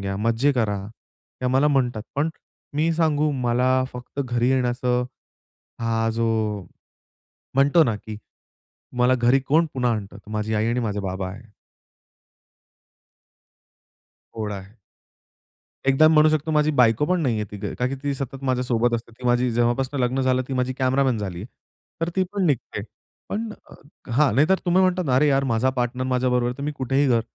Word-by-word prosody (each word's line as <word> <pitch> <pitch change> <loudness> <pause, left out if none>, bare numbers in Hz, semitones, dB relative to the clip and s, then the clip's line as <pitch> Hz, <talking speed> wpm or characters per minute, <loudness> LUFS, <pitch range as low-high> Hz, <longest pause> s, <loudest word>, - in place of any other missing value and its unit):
घ्या, 95 0 -3
मज्जे 115 +6 +2
करा 110 -5 0
हे 115 +3 -16
आम्हाला 130 +4 +3
म्हणतात. 125 -6 0
पण 145 +3 +1 0.5
मी 165 +2 +2
सांगू 155 -2 +1
मला 130 0 +1
फक्त 125 +3 -7
घरी 120 -2 0
येण्याचं 125 -1 +1 0.8
हा 115 0 0
जो 115 0 0 1.3
म्हणतो 145 +4 +5
ना 115 - 0
की 105 0 -8 0.8
मला 125 +1 +4
घरी 125 +2 +3
कोण 160 +3 +3
पुन्हा 125 -2 +1
आणतं 100 -2 -5
माझी 110 +1 -2
आई 110 +1 +1
आणि 120 +1 0
माझे 105 -3 -2
बाबा 95 -1 -3
आहे. 110 +4 -12 2.9
ओढ 105 -2 -3
आहे. 100 +3 -9 1.1
एकदा 145 +4 +6
मी 160 - +3
म्हणू 155 +1 +6
शकतो 155 0 0
माझी 150 0 +3
बायको 115 +4 +4
पण 180 0 +1
नाहीये 115 -6 0
तीथे, 105 -1 -5
कारण 125 - -1
की 135 - -3
ती 140 -1 -1
सतत 135 0 -6
माझ्यासोबत 125 -2 +1
असते. 115 0 -5
ती 125 - -13
माझी 120 +1 +2
जेव्हापासून 125 +4 0
लग्न 125 +2 +1
झालं 130 0 +2
ती - - -4
माझी 125 0 0
कॅमेरामन 130 -2 +2
झाली 95 -4 -5
आहे. - - -7 0.5
तर 165 - 0
ती 190 - +3
पण 200 -2 0
निघते. 140 -6 -1 0.5
पण 225 +2 -3 0.2
अ, - - -13 0.4
हां, 135 -3 +3
नाहीतर 155 +8 +4
तुम्ही 180 +2 +3
म्हणता 185 0 +2
ना, 130 -6 0
"अरे 150 +2 +4
यार! 135 0 +2
माझा 130 +1 +1
पार्टनर 125 +1 -1
माझ्याबरोबर 125 -1 +1
आहे, 125 - -3
तर - - -5
मी 150 +1 -2
कुठेही 135 +1 0
घर." 115 -2 +3
125 Hz, 170 wpm, -23 LUFS, 115-140 Hz, 2.9 s, एकदा